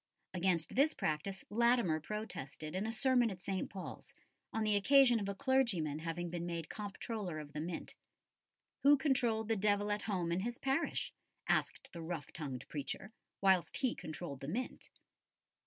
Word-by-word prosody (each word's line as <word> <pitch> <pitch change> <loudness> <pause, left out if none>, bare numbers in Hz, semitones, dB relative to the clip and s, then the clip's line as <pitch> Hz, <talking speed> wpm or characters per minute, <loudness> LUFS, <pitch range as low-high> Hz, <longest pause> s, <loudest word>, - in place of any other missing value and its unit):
Against 180 -3 +1
this 285 +5 +4
practice 175 +6 -2
Latimer 235 -7 +3
protested 155 -5 -5
in 190 +4 -1
a - - -1
sermon 245 0 +3
at 185 -3 -8
St. 190 -2 -2
Paul's, 190 -2 -8 0.4
on 220 - 0
the 215 -1 +3
occasion 245 +3 +6
of 200 -1 -2
a 200 - -3
clergyman 195 - +2
having 165 +1 -3
been 175 0 -3
made 170 -2 -4
Comptroller 205 -3 -4
of 150 -1 -8
the 150 - -3
Mint. 165 +1 -4 0.9
Who 285 +1 +7
controlled 245 -6 +2
the 225 - +2
devil 205 0 +2
at 205 0 0
home 180 -4 0
in 170 - +1
his 235 +5 -2
parish, 270 +4 0 0.3
asked - - 0
the 170 - -6
rough 165 -2 -5
tongued 135 -4 -5
preacher, 150 - -4 0.3
whilst 190 -3 +4
he 260 -4 +1
controlled 155 -3 -6
the 135 - -6
Mint? 240 - -4
195 Hz, 165 wpm, -36 LUFS, 165-230 Hz, 0.9 s, Who